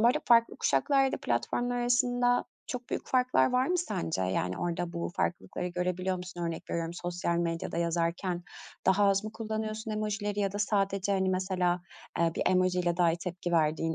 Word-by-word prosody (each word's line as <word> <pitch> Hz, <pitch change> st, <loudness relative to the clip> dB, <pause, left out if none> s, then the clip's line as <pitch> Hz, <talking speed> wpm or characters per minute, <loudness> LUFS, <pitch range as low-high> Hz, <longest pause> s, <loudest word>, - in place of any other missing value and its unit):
bu 230 Hz, -, +5 dB
arada 245 Hz, -, +3 dB
farklı 230 Hz, -1 st, +5 dB
kuşaklarda 275 Hz, -1 st, +2 dB
platformlar 240 Hz, -, 0 dB
arasında 245 Hz, 0 st, +2 dB, 0.2 s
çok 250 Hz, -1 st, -5 dB
büyük -, -, -3 dB
farklar 255 Hz, 0 st, +3 dB
var 250 Hz, +1 st, +3 dB
mı 360 Hz, 0 st, +1 dB
sence? 95 Hz, -, -2 dB
Yani 90 Hz, 0 st, -1 dB
orada 175 Hz, 0 st, -2 dB
bu 170 Hz, 0 st, -3 dB
farklılıkları 180 Hz, 0 st, -2 dB
görebiliyor 180 Hz, +1 st, -1 dB
musun? 180 Hz, -1 st, -8 dB
Örnek 165 Hz, -1 st, -4 dB
veriyorum, 165 Hz, 0 st, -2 dB
sosyal 175 Hz, -1 st, -2 dB
medyada 165 Hz, -1 st, -2 dB
yazarken 170 Hz, +1 st, -1 dB, 0.4 s
daha 195 Hz, +2 st, +5 dB
az 195 Hz, +1 st, +2 dB
mı 215 Hz, -, -5 dB
kullanıyorsun 220 Hz, 0 st, -4 dB
emojileri 210 Hz, -1 st, -2 dB
ya 195 Hz, -1 st, 0 dB
da 205 Hz, -, -4 dB
sadece, 195 Hz, -1 st, +1 dB
hani, 190 Hz, -1 st, +1 dB
mesela, 185 Hz, -1 st, 0 dB, 0.4 s
ııı, 165 Hz, -1 st, +2 dB
bir -, -, 0 dB
emojiyle 180 Hz, -1 st, +2 dB
dahi 170 Hz, -2 st, +4 dB
tepki 175 Hz, 0 st, -4 dB
verdiğin 160 Hz, 0 st, +2 dB
185 Hz, 170 wpm, -30 LUFS, 170-220 Hz, 0.4 s, bu